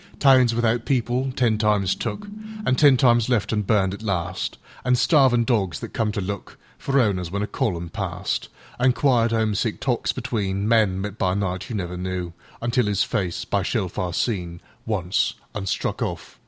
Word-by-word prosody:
Towns 130 -4 +5
without 115 0 +1
people, 130 0 0
ten 115 -4 +2
times 105 -3 +2
took, 210 - -4 0.4
An' - - +3
ten 140 -2 +6
times 120 -1 +4
left 115 -3 +1
an' 105 - +1
burned 100 -2 +1
at 100 - -8
last; 95 -6 -2 0.3
An' 125 0 +3
starvin' 125 -2 +4
dogs 105 -8 0
that - - -8
come 110 -2 0
to - - -2
lookFor 100 +7 -6
owners 95 -7 +1
when 100 +3 -2
a - - 0
column 95 -8 -2
passed; - - -3 0.3
An' 125 0 +4
quiet, 120 -4 +2
'omesick 110 -1 0
talks 125 -3 0
betweenMen, 105 -3 +1
met 105 +1 -5
by 95 0 +1
night, 95 -2 -2
you 115 - -4
never 90 -3 -3
knewUntil—'is 95 +5 -2
face—by 95 +1 -1
shellfire 95 -2 -2
seen—Once—an' 95 0 -3
struck - - -2
off. - - -5
105 Hz, 155 wpm, -23 LUFS, 95-120 Hz, 0.4 s, ten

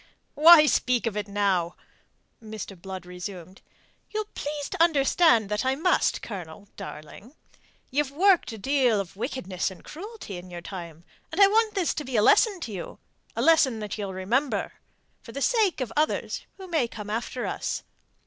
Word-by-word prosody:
"Why 310 +1 +8
speak 250 -4 +1
of 225 -3 -2
it 210 -1 -3
now?" 195 -4 0 0.7
Mr. 215 -2 -7
Blood 185 0 -8
resumed: 180 0 -8 0.5
"ye'll 430 0 -3
please 290 0 -4
to - - -2
understand 280 - +4
that 210 +2 -1
I 260 +1 +1
must, 335 +6 +1
Colonel, 195 -1 -8
darling. 195 - -10 0.6
Ye've 285 +1 +1
worked 355 0 +3
a 225 - -7
deal 250 -1 +2
of 185 -3 -5
wickedness 200 -6 -3
and 190 - -13
cruelty 385 - -8
in 180 +1 -10
your 175 -1 -7
time, 170 -3 -8 0.3
and 320 - -4
I 400 - +10
want 435 +2 +2
this 370 -4 +1
to 300 - -4
be 260 -2 -5
a 210 - +4
lesson 405 - +4
to 235 - -5
you, 185 -4 -7 0.4
a - - -1
lesson 320 -8 +4
that 210 -2 -4
ye'll 200 -3 -4
remember 230 +10 -1 0.5
for 230 - -12
the 275 - -4
sake 420 - +2
of 235 -3 -3
others 305 +1 -1
who 380 -1 -9
may 315 -9 +1
come 210 -2 -8
after 235 +3 -3
us. - - -3
235 Hz, 175 wpm, -26 LUFS, 195-305 Hz, 0.7 s, I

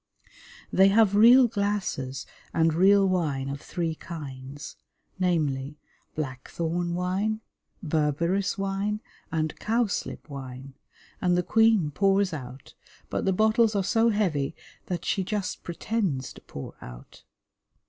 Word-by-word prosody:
They 190 +1 +6
have 205 0 +4
real 240 +4 +8
glasses 200 - -2 0.3
and 165 -1 +3
real 195 +3 +5
wine 150 -8 0
of 140 +1 -5
three 165 -2 -2
kinds, 145 -4 -8 0.4
namely, 150 -6 0 0.4
blackthorn 165 +5 -3
wine, 195 +5 -1 0.4
berberris 165 +5 0
wine, 195 +2 -1 0.3
and 155 -1 -1
cowslip 225 -1 -1
wine, 135 -1 -8 0.5
and 180 -1 +3
the 180 - +1
Queen 220 -5 +3
pours 195 +2 +2
out, 130 -2 -8 0.4
but - - -1
the 190 - +3
bottles 220 +2 +3
are 200 - +2
so 225 +4 +3
heavy 175 -11 0 0.3
that 180 -1 -3
she 195 - 0
just 200 0 -3
pretends 170 - -2
to - - -14
pour 70 - -8
out. - - -12
180 Hz, 120 wpm, -27 LUFS, 145-200 Hz, 0.5 s, real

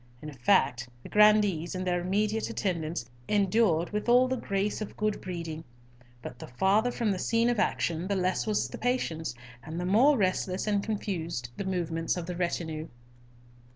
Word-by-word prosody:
In 150 +2 -8
fact 130 -3 +2
the - - -10
grandees 210 -5 +4
and 185 0 -3
their 175 -1 0
immediate 210 +4 0
attendants 170 - -2 0.2
endured 200 -4 +2
with 210 +3 -2
all 250 +1 +6
the 260 - 0
grace 200 -3 -2
of 215 - -6
good 215 0 -1
breeding; 165 -3 -5 0.6
but 125 - -8
the - - -8
farther 195 - +2
from 235 -3 0
the 190 - -2
scene 230 +4 +2
of 235 - -1
action, 170 -4 0
the 200 - 0
less 185 +2 0
was 210 -1 +1
the - - -8
patience, 165 - -1 0.3
and 160 +4 -6
the 180 - -2
more 250 +10 +5
restless 185 -2 0
and 205 -2 +1
confused 170 - -3
the 200 - -3
movements 170 -2 -1
of 175 - -4
the 180 +1 -5
retinue. 165 -3 -2
185 Hz, 175 wpm, -29 LUFS, 165-210 Hz, 0.6 s, all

